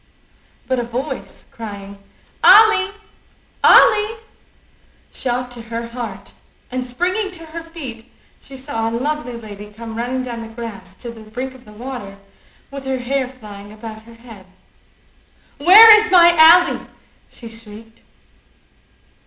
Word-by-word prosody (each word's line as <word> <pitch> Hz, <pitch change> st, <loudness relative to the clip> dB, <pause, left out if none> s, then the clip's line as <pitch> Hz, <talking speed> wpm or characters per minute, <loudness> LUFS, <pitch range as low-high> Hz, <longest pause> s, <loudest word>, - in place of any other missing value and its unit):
But 260 Hz, -1 st, 0 dB
a -, -, -2 dB
voice 255 Hz, +4 st, -6 dB
crying, 200 Hz, -3 st, -9 dB, 0.4 s
"Ally! 425 Hz, 0 st, +6 dB, 0.7 s
Ally!" 430 Hz, +1 st, +5 dB, 1.0 s
shot 250 Hz, 0 st, -3 dB
to 240 Hz, -1 st, -6 dB
her 230 Hz, +1 st, -6 dB
heart, 235 Hz, -5 st, -8 dB, 0.4 s
and 255 Hz, 0 st, -3 dB
springing 360 Hz, -, -2 dB
to 330 Hz, -2 st, -9 dB
her 325 Hz, +1 st, -8 dB
feet 265 Hz, -9 st, -10 dB, 0.3 s
she 270 Hz, -, -12 dB
saw 225 Hz, -4 st, -3 dB
a 230 Hz, -, -3 dB
lovely 290 Hz, -1 st, -3 dB
lady 210 Hz, -3 st, -10 dB
come 225 Hz, +1 st, -9 dB
running 250 Hz, +3 st, -3 dB
down 240 Hz, -2 st, -6 dB
the 225 Hz, -, -8 dB
grass 225 Hz, -5 st, -9 dB
to 235 Hz, +4 st, -9 dB
the 220 Hz, -2 st, -14 dB
brink 255 Hz, +4 st, -6 dB
of 260 Hz, -1 st, -17 dB
the 210 Hz, -, -15 dB
water 215 Hz, -3 st, -8 dB, 0.5 s
with 275 Hz, -1 st, -8 dB
her 265 Hz, 0 st, -2 dB
hair 260 Hz, +1 st, -2 dB
flying 210 Hz, -5 st, -12 dB
about 220 Hz, 0 st, -10 dB
her 230 Hz, -, -14 dB
head. 225 Hz, -5 st, -15 dB, 1.1 s
"Where 425 Hz, +8 st, +9 dB
is 435 Hz, 0 st, +1 dB
my 345 Hz, -2 st, +7 dB
Ally?" 340 Hz, +2 st, +5 dB, 0.4 s
she 235 Hz, -, -12 dB
shrieked. 225 Hz, 0 st, -12 dB
245 Hz, 135 wpm, -18 LUFS, 225-285 Hz, 1.1 s, Where